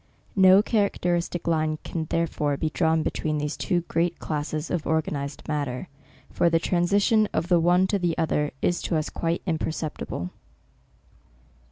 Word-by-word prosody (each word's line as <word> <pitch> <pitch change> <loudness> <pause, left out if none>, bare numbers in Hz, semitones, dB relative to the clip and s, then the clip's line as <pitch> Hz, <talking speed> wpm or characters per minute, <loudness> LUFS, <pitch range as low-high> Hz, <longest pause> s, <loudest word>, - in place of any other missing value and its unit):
No 190 +1 +7
characteristic 180 -6 0
line 155 -2 +1
can 160 -2 -3
therefore 150 -3 -1
be 155 +1 -1
drawn 160 -2 +2
between 155 0 -1
these 150 +1 -2
two 175 -1 0
great 170 0 -1
classes 155 +1 -3
of 170 -4 -2
organized 145 -3 -2
matter; 145 0 -3 0.4
for 170 - +2
the 165 - +3
transition 200 +6 +2
of 170 +2 -1
the 175 -2 +5
one 175 +3 +4
to 200 +1 0
the 175 -3 0
other, 150 -2 +1
is 175 - +1
to 170 - -1
u« 155 - +2
quite 165 0 -1
imperceptible. 155 - -3
165 Hz, 150 wpm, -25 LUFS, 155-175 Hz, 0.4 s, No